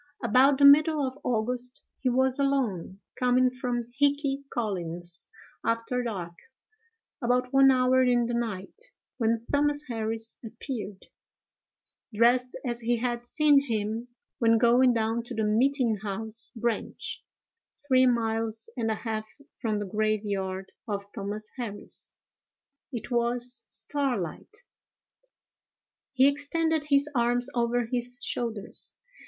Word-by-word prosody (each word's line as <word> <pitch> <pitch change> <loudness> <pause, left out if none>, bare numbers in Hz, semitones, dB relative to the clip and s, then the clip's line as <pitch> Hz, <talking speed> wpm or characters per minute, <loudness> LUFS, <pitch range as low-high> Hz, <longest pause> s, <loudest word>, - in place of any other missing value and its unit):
About 270 +2 +5
the 285 - +5
middle 300 +1 +6
of 260 +2 -5
August 250 +3 -1
he 260 - +1
was 260 +2 +3
alone, 240 -10 0 0.2
coming 250 0 +3
from 250 -1 -2 0.2
Hickey 285 -1 +1
Collins's, 175 -6 -4 0.3
after 230 +2 0
dark, 190 -8 -4 0.9
about 250 +1 +1
one 270 0 +7
hour 255 0 +4
in 245 -2 +3
the 240 - -2
night, 220 -5 -3 0.5
when 230 0 +1
Thomas 290 0 +2
Harris 225 -1 -4
appeared, 225 -3 -6 1.1
dressed 245 +3 +3
as 240 -1 -2
he 240 +1 +1
had 240 0 -2
seen 290 0 +4
him 220 +1 -2 0.3
when 230 -1 +4
going 245 +2 +5
down 225 0 0
to 240 +1 -7
the 220 - 0
meeting 235 +1 +2
house 220 +2 -4
branch, 235 -1 -3 0.6
three 260 -1 +5
miles 225 -2 -1
and 230 -3 -1
a 220 - +1
half 220 -1 -4 0.3
from 220 -3 0
the 205 - -3
graveyard 200 -2 -2 0.2
of 200 -2 -3
Thomas 205 +2 -5
Harris. 220 -5 -6 0.8
It 240 0 -6
was 240 +1 -1
starlight. 275 - -4 1.5
He 265 0 +5
extended 300 +2 0
his 285 -1 +3
arms 245 0 +1
over 240 0 +1
his 245 +1 -3
shoulders. 230 -6 -3
240 Hz, 120 wpm, -28 LUFS, 220-260 Hz, 1.5 s, one